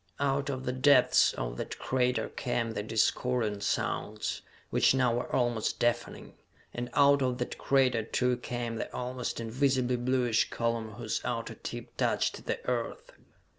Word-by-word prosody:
Out 140 0 0
of 130 -1 -4
the 125 - 0
depths 130 0 +5
of - - -4
that - - -5
crater 125 -3 0
came 115 -2 -2
the 105 - -3
discordant 110 0 0
sounds, 105 +1 -2 0.3
which - - +4
now 125 -3 +3
were 120 +1 -3
almost 120 -3 0
deafening, 120 0 -1 0.4
and 120 0 -4
out 140 0 +5
of 125 -1 0
that 125 - -4
crater 130 -4 +3
too 125 +3 0
came 120 -1 -4
the - - -4
almost 125 -1 -3
invisibly 125 +2 +1
bluish 120 -2 +1
column 115 -2 -2
whose 115 -1 -3
outer 115 -2 -3
tip - - -8
touched - - 0
the - - -3
Earth. 120 -2 -3
125 Hz, 150 wpm, -30 LUFS, 115-130 Hz, 0.4 s, depths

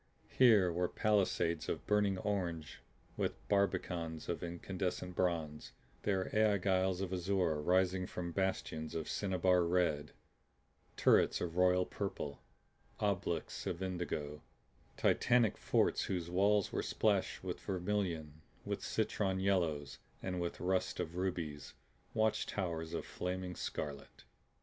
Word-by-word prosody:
Here 105 -9 +6
were 90 +1 +1
palisades 95 -6 +1
of - - -3
burning 105 -2 +2
orange 90 -6 -2 0.4
with - - -1
barbicans 90 -5 0
of 85 -3 -2
incandescent 90 +1 -3
bronze; 80 -5 -1 0.3
there 95 -2 0
aiguilles 95 -3 +2
of 95 -1 -2
azure 90 -4 +1
rising 90 +2 +2
from 85 -1 -4
bastions 80 -4 -2
of 80 -2 -3
cinnabar 95 -2 +2
red; 85 -4 +1 0.8
turrets - - +4
of 85 -1 -3
royal 90 0 +4
purple, 90 -9 -4 0.6
obelisks - - -1
of 90 +2 -2
indigo; 80 -5 -3 0.6
titanic 120 -4 +3
forts - - +1
whose 85 -2 -3
walls 100 +2 +3
were - - 0
splashed - - 0
with - - -4
vermilion, 90 -5 -2 0.2
with - - -3
citron 95 -2 0
yellows 85 -7 0 0.2
and 90 -1 -2
with 85 - -3
rust 95 +1 0
of 80 - -3
rubies; 85 -6 -3 0.4
watch 110 0 +2
towers 85 -4 -3
of - - -3
flaming 90 0 -4
scarlet. 70 -5 -5
90 Hz, 120 wpm, -35 LUFS, 85-95 Hz, 0.8 s, Here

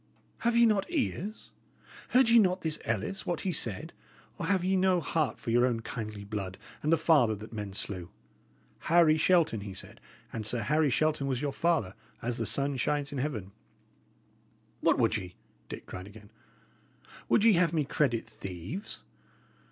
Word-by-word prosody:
Have 235 0 +1
ye 235 - +7
not 210 -3 +2
ears? 225 - -3 0.6
Heard 255 -2 +5
ye 235 0 +7
not 185 -3 +2
this 160 -2 -2
Ellis, 115 - -2
what 175 - -1
he 185 - -1
said? 115 - -3 0.5
or - - -2
have 190 -2 +2
ye 190 +1 +2
no 185 -1 +3
heart 160 -3 -1
for 115 - -4
your 120 +1 +4
own 120 -3 +1
kindly 110 -3 -6
blood 100 -2 -5 0.2
and 155 - 0
the 165 - +5
father 145 -9 +4
that 110 +3 -10
men 105 -3 -5
slew? 90 -3 -4 0.7
'Harry 165 -2 +4
Shelton,' 160 - +3
he 100 -2 -7
said; - - -11 0.3
and 110 - -3
Sir 115 +1 -1
Harry 150 +5 +2
Shelton 150 +1 +1
was 130 -3 -1
your 140 -2 -1
father, 160 - +1 0.3
as 120 0 -2
the - - 0
sun 140 0 0
shines 145 +3 0
in 140 - -3
heaven." 115 -9 -3 1.3
"What - - +3
would - - +2
ye?" 90 -1 -8 0.3
Dick - - -7
cried 90 +1 -8
again. 105 0 -14 1.0
"Would 215 - +4
ye 225 -1 +7
have 170 -2 +3
me 155 -3 0
credit 130 -5 0
thieves?" 95 - -7
145 Hz, 175 wpm, -30 LUFS, 110-175 Hz, 1.3 s, ye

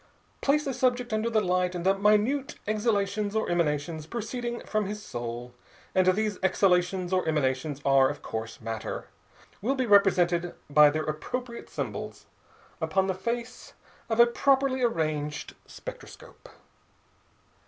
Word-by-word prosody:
Place 295 +2 +2
a 270 - -1
subject 250 -1 0
under 215 +2 0
the 220 -2 +2
light, 180 0 +1
and 175 0 -4
the 195 +1 +4
minute 215 +8 +2
exhalations 210 -1 0
or 220 - +1
emanations 155 -1 -1
proceeding 235 +3 -4
from 215 -2 -1
his 210 +1 -6
soul 120 0 -6 0.4
and 185 -1 +3
these 205 +1 +1
exhalations 185 -1 +2
or 185 -2 +1
emanations 140 -1 0
are, 135 -1 +5
of 145 - -7
course, 110 0 -5
matter 115 -1 -5 0.5
will 255 +7 0
be 260 -1 0
represented 180 -4 +3 0.2
by 150 0 +8
their 155 +1 -1
appropriate 235 +11 -5
symbols - - -5 0.6
upon 190 -1 +1
the 190 - 0
face 235 +5 -5 0.4
of 225 0 0
a 235 - +10
properly 265 +2 +2
arranged 155 -9 -1
spectroscope. - - -11
195 Hz, 135 wpm, -27 LUFS, 155-235 Hz, 0.6 s, a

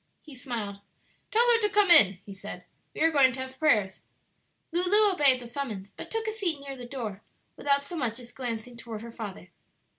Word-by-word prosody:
He 305 - -13
smiled. 230 -6 -5 0.5
"Tell 465 +2 +3
her 465 - +5
to 420 - +2
come 410 -2 +3
in," 195 - +8
he 200 - -9
said; 195 - -9 0.3
"we - - -5
are 325 +1 +4
going 270 -4 +4
to 260 - -7
have 260 0 -7
prayers." 215 -12 +2 0.7
Lulu 390 +5 +4
obeyed 280 -7 +4
the 245 - -10
summons, 235 -6 -6
but - - -10
took 450 0 -3
a 435 - -1
seat 375 -9 -2
near 280 -1 -8
the 245 -2 -9
door, 225 -6 -6 0.3
without 280 0 +1
so 315 +5 -7
much 240 -4 -2
as 245 -1 -12
glancing 240 -1 -5
toward 225 -2 -8
her 235 - -9
father. 210 -4 -8
260 Hz, 205 wpm, -27 LUFS, 225-320 Hz, 0.7 s, in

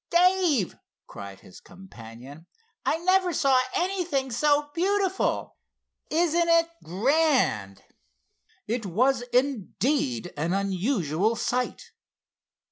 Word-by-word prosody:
"Dave!" 350 - +2 0.3
cried 100 -1 -10
his 90 - -15
companion, 145 -4 -13 0.4
"I 315 - +1
never 370 0 +3
saw 270 -4 +3
anything 345 -8 -1
so 290 +4 +1
beautiful! 385 +2 0 0.5
Isn't 340 +1 +2
this 335 0 +4 0.2
grand!" 210 - +1 0.8
It 230 +2 -2
was, 250 +8 +2
indeed, 245 - 0
an 160 +4 -1
unusual 195 - 0
sight. 250 +2 -3
255 Hz, 90 wpm, -26 LUFS, -, 0.8 s, this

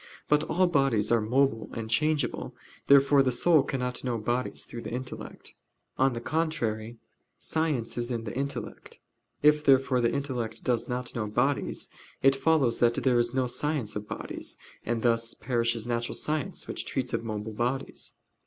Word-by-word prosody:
But 150 0 +3
all 185 +4 +2
bodies 135 -11 +2
are 115 -1 +4
mobile 120 0 +1
and 115 -1 -4
changeable. 145 +4 0 0.3
Therefore 140 0 +6
the 130 -1 +2
soul 155 +5 +4
cannot 125 -2 -3
know 125 -2 -1
bodies 120 +3 -2
through 120 - -7
the - - -6
intellect. 125 +1 -7 0.5
On 135 0 +4
the 115 - -3
contrary, 120 -6 -2 0.4
Science 150 -8 -1
is 120 +1 -2
in 115 -2 -2
the 110 - -6
intellect. 140 +2 -5 0.4
If, 150 0 +5
therefore, 135 -2 +4
the 115 - +2
intellect 125 -5 -3
does 120 -3 0
not 125 0 -3
know 110 -3 -2
bodies, 125 +7 0 0.4
it 135 0 +6
follows 135 -4 +2
that 120 -1 +4
there 125 -2 +2
is 120 +1 0
no 130 -1 +2
science 125 -2 -1
of 105 0 -5
bodies; - - -5 0.3
and 115 -1 -2
thus 115 -1 +2
perishes 115 -1 0
natural 120 -1 -1
science, 150 -2 -2
which - - -4
treats - - -2
of - - -1
mobile 110 -1 -4
bodies. 125 +5 -3
125 Hz, 165 wpm, -28 LUFS, 115-140 Hz, 0.5 s, Therefore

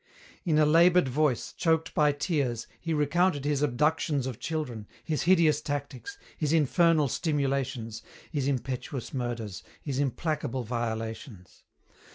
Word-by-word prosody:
In 160 -4 +2
a 155 - +5
laboured 170 +1 +5
voice, 135 -1 0
choked 160 -1 +1
by 150 -1 +4
tears, 140 -6 -1
he 165 - -4
recounted 150 0 +1
his 145 -1 +1
abductions 150 +1 +1
of 130 -4 -5
children, 125 -10 -4 0.2
his 155 -2 -1
hideous 160 -5 +4
tactics, 145 - -5 0.2
his 150 -1 -1
infernal 160 0 +4
stimulations, 135 -7 -1 0.3
his 140 -4 -1
impetuous 130 -1 -3
murders, 120 -6 -4 0.2
his 140 -3 -2
implacable 140 -2 -1
violations. 115 -3 -5
145 Hz, 125 wpm, -28 LUFS, 125-155 Hz, 0.3 s, a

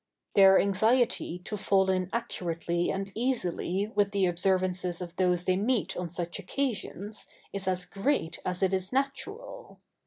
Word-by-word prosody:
] - - -49
Their 195 -1 +8
anxiety 220 -1 +2
to 215 - -3
fall 190 -1 +2
in 185 -1 0
accurately 175 -6 -2
and 195 0 -3
easily 210 -4 -1
with 205 -1 +3
the 195 -2 +3
observances 180 0 0
of 175 -1 -7
those 180 -1 +2
they 185 0 +2
meet 225 +2 0
on 180 -1 -3
such 170 +1 -3
occasions 215 -5 -3 0.3
is 200 -1 -4
as 180 -1 0
great 195 - -1
as 180 +1 -2
it 190 0 +2
is 185 0 -1
natural. 410 - -3
190 Hz, 155 wpm, -29 LUFS, 180-215 Hz, 0.3 s, Their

